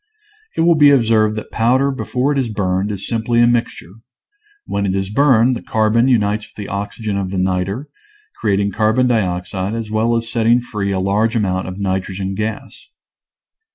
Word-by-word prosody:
It - - +2
will 170 +1 +5
be 150 -2 +6
observed 110 -5 +3
that 110 - -7
powder 130 +5 +2
before 135 +1 -1
it 140 - 0
is 125 -3 -1
burned 95 -1 -1
is 100 -1 -5
simply 115 0 0
a 120 - +6
mixture; 120 -7 -1 0.7
when 100 0 -2
it 95 - -1
is 95 0 -2
burned 130 -1 +3
the - - -6
carbon 110 +3 +1
unites 105 -4 +1
with - - -22
the 105 - -7
oxygen 100 +1 -3
of 95 -2 -2
the 95 - -4
niter, 95 +8 -1 0.5
creating 100 -1 +1
carbon 110 +5 +2
dioxide 95 -3 -1
as 115 -2 -5
well 115 +2 +1
as 115 0 -1
setting 115 +1 +2
free 105 -5 -4
a 95 - -1
large 105 +5 +1
amount 95 -4 -1
of 90 0 -6
nitrogen 95 0 -3
gas. 110 +2 -5
110 Hz, 180 wpm, -18 LUFS, 100-120 Hz, 0.7 s, be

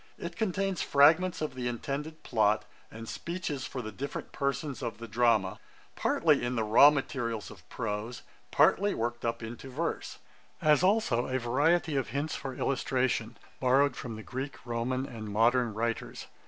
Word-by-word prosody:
It 170 0 -6
contains 195 -2 -1
fragments 160 +6 +4
of 150 - -3
the 125 -1 -3
intended 145 +6 -4
plot, 110 -2 +2 0.2
and 115 +1 -9
speeches 170 -4 -4
for 125 - -5
the 110 - -6
different 140 +4 -6
persons 140 0 -2
of 115 -4 -4
the 115 +1 -8
drama, 115 -4 +2 0.4
partly - - +2
in 120 +1 -1
the 115 - +1
raw 115 +7 +8
materials 120 -6 -3
of - - -15
prose, 110 +4 -4 0.3
partly 205 +1 +3
worked 120 +1 -3
up 115 0 -2
into 120 +4 -7
verse; 160 +6 -3 0.4
as 150 -1 +4
also 185 - +2
a 130 - 0
variety 145 +6 +2
of 135 - 0
hints 140 +6 -2
for 135 -1 -5
illustration, 125 -4 0 0.2
borrowed 135 +1 +3
from 115 -3 -6
the 110 - -8
Greek, 130 +9 -5
Roman, 125 +2 -1
and 110 -5 -7
modern 115 +3 +3
writers. 115 +1 -3
125 Hz, 160 wpm, -30 LUFS, 115-145 Hz, 0.4 s, raw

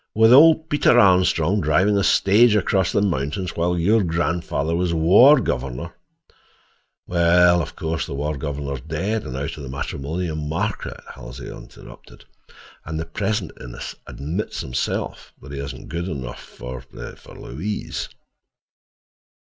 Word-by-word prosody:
"With 110 +2 +6
old 160 +3 +7
Peter 145 -5 +3
Armstrong 95 -2 +3
driving 90 +7 +2
a 100 - +2
stage 105 +5 +4
across 95 -3 +1
the 100 - +1
mountains 90 +1 -2
while 90 +1 0
your 105 +7 +3
grandfather 85 -2 -1
was 85 -1 0
war 105 - +7
governor—" 65 - -3 1.1
"Well, 85 0 +4
of - - -7
course, 80 -1 -3
the - - -5
war 75 +2 -2
governor's 70 -2 -4
dead, 95 - -3
and 65 - -5
out 70 +4 -4
of - - -8
the 70 - -7
matrimonial 75 +5 -4
market," 80 +7 -3
Halsey 60 - -9
interrupted. - - -14 0.6
"And 80 +1 -5
the 80 - -3
present 100 +2 -2
Innes - - -7
admits 85 +9 -4
himself 65 -1 -4
he 70 +1 -8
isn't 70 -2 -7
good 85 +2 -3
enough 65 -8 -6
for—for 60 0 -10
Louise." 100 +11 -5
85 Hz, 135 wpm, -22 LUFS, 70-100 Hz, 1.1 s, old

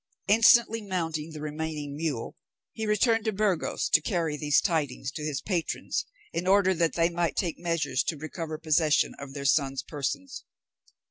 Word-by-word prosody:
Instantly 225 +1 +5
mounting 165 -6 -3
the 155 -1 -8
remaining 150 -1 -4
mule, 145 -7 -3 0.4
he 220 -1 -4
returned 225 +1 +3
to 220 - +1
Burgos 200 -4 0
to 155 - +5
carry 165 -2 -1
these 150 -1 +3
tidings 145 -6 -1
to 155 - -7
his 150 -3 -2
patrons, 175 -5 -2 0.3
in 170 +2 -2
order 190 -1 +4
that 165 -2 +1
they 170 0 +3
might 170 -1 -1
take 175 -4 -2
measures 165 -6 0
to 160 - -2
recover 155 +1 -5
possession 155 -1 +2
of 140 0 -9
their 140 -1 -5
sons' 135 -1 +2
persons. 255 - -4
160 Hz, 160 wpm, -27 LUFS, 150-190 Hz, 0.4 s, Instantly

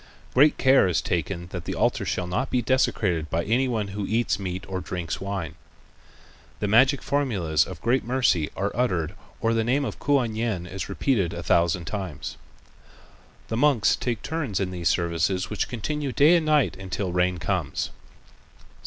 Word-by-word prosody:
Great 145 +4 +5
care 130 -6 +5
is 90 - +1
taken 85 +1 -2
that 90 -2 -6
the - - -3
altar - - +1
shall 90 - -1
not 110 +10 -2
be 125 - +1
desecrated 100 - +1
by 85 +1 0
any 120 +7 +1
one 110 -5 -2
who 100 0 -4
eats 110 -2 0
meat 95 -1 -4
or 95 -1 -3
drinks 85 -4 -4
wine. 95 -5 -4 1.1
The 105 - -1
magic 130 +6 +4
formulas 100 - +1
of 95 -4 -8
great 125 +3 +2
mercy 120 - +1
are 100 +2 -1
uttered 90 -10 0 0.3
or 115 0 +2
the 115 -1 +1
name 135 +5 +1
of - - -5
Kuan 135 -6 +1
Yin 110 -6 -2
is 95 +2 -6
repeated 100 - 0
a - - -5
thousand 85 0 +2
times. 95 -6 -5 1.1
The 110 - -1
monks, 125 -5 +4
take 120 -3 -3
turn 150 -8 -3
in 95 -2 -1
these 85 -2 0
services 85 +3 0
which 105 - -1
continue 135 +5 -3
day 150 +7 +5
and 165 -2 +1
night 150 -4 +3
until 95 0 -3
rain 90 0 +1
comes. 80 -2 -2
100 Hz, 170 wpm, -25 LUFS, 90-125 Hz, 1.1 s, Great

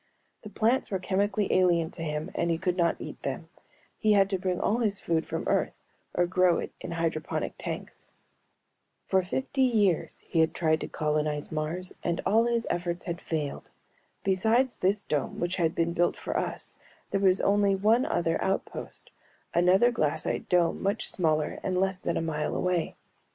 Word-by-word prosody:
The 210 - -9
plants 230 +5 +1
were 195 - 0
chemically 200 +2 0
alien 175 -3 +3
to 175 - -9
him 150 +2 -3
and 170 - 0
he 165 - +1
could 180 +1 -1
not 170 -2 +2
eat - - -8
them; - - -4 0.5
he 215 -1 +4
had 195 -1 +4
to 190 - 0
bring 180 -1 -1
all 225 +3 +1
his 210 -4 0
food 165 -1 -1
from - - -3
Earth - - +1 0.4
or 175 - +3
grow 180 -1 +3
it - - -4
in - - -5
hydroponic 165 -2 -2
tanks. - - -6 1.0
For 190 - +3
fifty 265 +9 -2
years 210 -9 +2
he 165 - -1
had 160 0 +3
tried 155 -2 +1
to - - -3
colonize 150 -1 -1
Mars 160 +4 -3
and 170 -1 -1
all 225 +3 +4
his 235 -1 0
efforts 175 0 -2
had 170 -1 -4
failed. 150 -3 -4 0.5
Besides 225 +7 +2
this 195 +2 +1
dome 145 -3 -2
which 175 +1 -1
had 165 -2 +1
been 170 0 +1
built 175 0 +1
for - - -4
us - - -3 0.4
there 195 - +1
was 190 -1 +4
only 200 -1 +3
one 220 +6 +3
other 165 -1 0
outpost, 190 - -3 0.4
another 185 +7 +5
glassite 155 -11 -1
dome 175 -1 +2
much 200 +3 0
smaller 155 -4 0
and 185 -1 -1
less 190 -1 0
than 170 - -1
a - - 0
mile 150 -2 -2
away. 180 -2 0
180 Hz, 175 wpm, -28 LUFS, 165-200 Hz, 1.0 s, another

